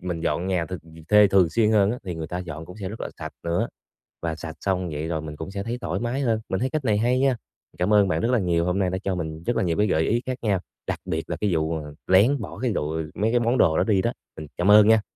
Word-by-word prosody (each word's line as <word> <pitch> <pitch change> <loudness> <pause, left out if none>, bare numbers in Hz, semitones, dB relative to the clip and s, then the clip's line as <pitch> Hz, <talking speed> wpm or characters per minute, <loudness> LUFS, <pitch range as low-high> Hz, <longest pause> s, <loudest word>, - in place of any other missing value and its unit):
mình 90 -2 -4
dọn 85 +3 -1
nhà 90 -3 0
th - - -19
th - - 0 0.3
thuê 105 0 +7
thường 95 -4 +4
xuyên 110 +1 +2
hơn 105 -2 +4
á, 125 - -3
thì 90 -3 -4
người 80 -1 -5
ta 90 - -4
dọn 80 -3 -6
cũng 90 - -11
sẽ 95 - -3
rất 110 +4 -8
là - - -3
sạch - - -6
nữa, 85 +1 0 0.5
và 80 -1 -2
sạch 80 0 -7
xong 90 -2 -1
vậy 75 +1 -4
rồi 80 -2 -2
mình 75 -1 -7
cũng 80 +5 -7
sẽ 100 0 -4
thấy 115 +3 -3
thoải - - -2
mái 120 +4 -2
hơn, 115 -4 +1
mình 95 - 0
thấy 130 - 0
cách 145 -1 -2
này 105 -2 +3
hay 125 +4 +2
nha. 135 -1 +3 0.4
Cảm 90 +4 +1
ơn 100 -1 +5
bạn 80 -2 0
rất 120 - +1
là 125 - +3
nhiều, 85 -3 +1
hôm 90 +2 0
nay 95 -2 +2
đã 95 - -2
cho 95 -1 -1
mình 80 -2 -5
rất 120 - 0
là - - +1
nhiều 85 -3 0
cái 105 +1 +3
gợi 80 -3 +2
ý 115 +7 +1
khác 130 0 -3
nhau, 100 -5 +1 0.3
đặc - - -2
biệt 80 0 -3
là 85 - -1
cái 105 - +2
vụ, 80 +1 0
ờ, 75 -1 -8
lén 110 +10 +5
bỏ - - -7
cái 125 -3 +1
đồ 75 -6 -1
ờ, 80 0 -2
mấy 110 +2 +1
cái 120 - +3
món 120 +2 +1
đồ 80 -8 +4
đó - - +3
đi 100 -4 +2
đó, 115 - 0 0.2
ừ, 80 - -7
cảm 95 +4 +3
ơn 105 0 +8
nha. 110 -1 +6
95 Hz, 315 wpm, -24 LUFS, 85-110 Hz, 0.5 s, ơn